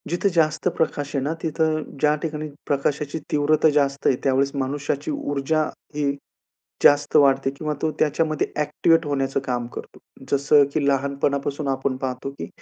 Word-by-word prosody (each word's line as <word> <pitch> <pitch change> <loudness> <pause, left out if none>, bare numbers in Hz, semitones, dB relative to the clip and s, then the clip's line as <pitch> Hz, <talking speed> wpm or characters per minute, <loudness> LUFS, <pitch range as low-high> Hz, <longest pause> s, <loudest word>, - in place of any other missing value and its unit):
जिथे 175 +4 +1
जास्त 155 +1 +2
प्रकाश 145 -3 -1
आहे 135 - 0
ना, 150 +3 -1
तिथं 155 -1 0 0.2
ज्या 150 +1 +3
ठिकाणी 155 -1 -3 0.2
प्रकाशाची 145 +2 -1
तीव्रता 150 +2 +3
जास्त 140 -2 +1
आहे, 130 - +4
त्यावेळेस 135 +1 +2
मनुष्याची 140 +2 -2
ऊर्जा 145 +2 0 0.3
ही 145 -2 +1 0.7
जास्त 145 +1 +5
वाढते 135 -2 +4
किंवा 150 +2 -4
तो 160 - +1
त्याच्यामध्ये 155 0 +1
ॲक्टिव्हेट 155 +2 +2
होण्याचं 135 -1 -1
काम 120 -2 -2
करतो. - - -9 0.3
जसं 140 +1 +5
की 155 - +1
लहानपणापासून 140 +1 0
आपण 135 0 -1
पाहतो 130 0 -4
की 85 - -5
145 Hz, 145 wpm, -23 LUFS, 140-155 Hz, 0.7 s, जास्त